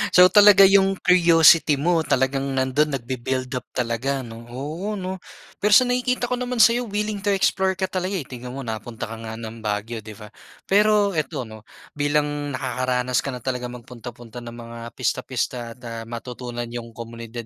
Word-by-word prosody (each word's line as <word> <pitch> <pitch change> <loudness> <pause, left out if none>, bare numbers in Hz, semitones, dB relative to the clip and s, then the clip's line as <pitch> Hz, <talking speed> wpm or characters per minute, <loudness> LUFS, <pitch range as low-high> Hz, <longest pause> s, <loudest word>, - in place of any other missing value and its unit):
So 180 - +9
talaga 205 0 +8
yung 195 0 +4
curiosity 165 -4 +5
mo 165 +3 +2
talagang 135 -1 0
nandun 135 +2 +1
nagbi-build 130 +1 -3
up 125 -1 -4
talaga 125 +3 -2
'no? 115 0 -10
Oo, 155 - -5
'no? 185 -1 -5 0.4
Pero 210 - +2
sa 230 +5 +7
nakikita 250 0 0
ko 245 - -2
naman 250 0 -3
sayo 235 +1 +4
willing 210 0 -2
to 205 - -1
explore 190 -1 +1
ka 190 - 0
talaga, 185 +1 -2
eh, 155 - -5
tignan 125 -1 -8
mo 135 - -6
napunta 110 0 -5
ka 110 - -8
nga 110 0 -7
ng 115 0 -8
Baguio 110 +2 -3
'di 105 -1 -11
ba? 105 0 -12 0.3
Pero 205 0 +3
eto 150 -5 -2
'no, 110 -1 -11 0.3
bilang 145 0 +1 0.3
nakakaranas 125 0 -1
ka - - -5
na 125 - -4
talaga 125 0 -4
magpunta-punta 120 -1 -10
ng 120 0 -9
mga 115 0 -9 0.2
pista-pista 120 -2 -2
at, - - -24
ah, 115 -1 -6
matutunan 120 0 -6
'yung 115 0 -7
komunidad 115 0 -8
130 Hz, 175 wpm, -23 LUFS, 120-190 Hz, 0.4 s, So